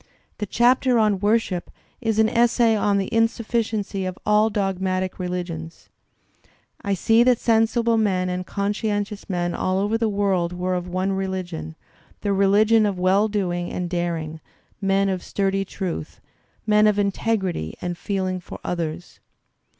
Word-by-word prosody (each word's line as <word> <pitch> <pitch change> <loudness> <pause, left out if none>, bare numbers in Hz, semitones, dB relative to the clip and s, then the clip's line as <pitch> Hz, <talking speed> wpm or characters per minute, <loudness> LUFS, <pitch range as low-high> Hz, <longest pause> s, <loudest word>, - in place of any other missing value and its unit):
The 210 - -2
chapter 245 +3 +3
on 210 -3 +2
"Worship" 205 -3 0 0.3
is 225 -3 0
an 220 0 +5
essay 235 0 +3
on 205 -1 +2
the 195 - 0
insufficiency 225 -3 0
^ 185 - -1
of 185 - -9
all 210 +1 +4
dogmatic 190 -3 -1
religions. 175 -3 -5 0.9
"I 200 -1 0
see 225 +5 +3
that 245 0 +4
sensible 230 0 +2
men 190 -4 +1
and 180 0 -2
conscientious 205 +1 -2
men 175 -2 -1
all 185 0 0
over 205 +3 0
the 225 -1 +1
worid 195 -4 0
were 180 +1 -2
of 180 0 -2
one 185 +2 -1
religion 185 - -4 0.2
— - - -31
the 200 - 0
religion 210 +3 +4
of 200 -2 -2
well 190 +4 +3
doing 180 -4 -2
and 180 - -3
daring, 165 -3 -3 0.4
men 195 0 +2
of 190 -2 -1
sturdy 195 0 -1
truth, 180 - -5 0.5
men 210 0 +4
of 210 -1 +2
integrity 200 - -1
and 175 -1 -3
feeling 185 0 -2
for 180 - -10
others. 170 -1 -4
195 Hz, 150 wpm, -23 LUFS, 180-215 Hz, 0.9 s, an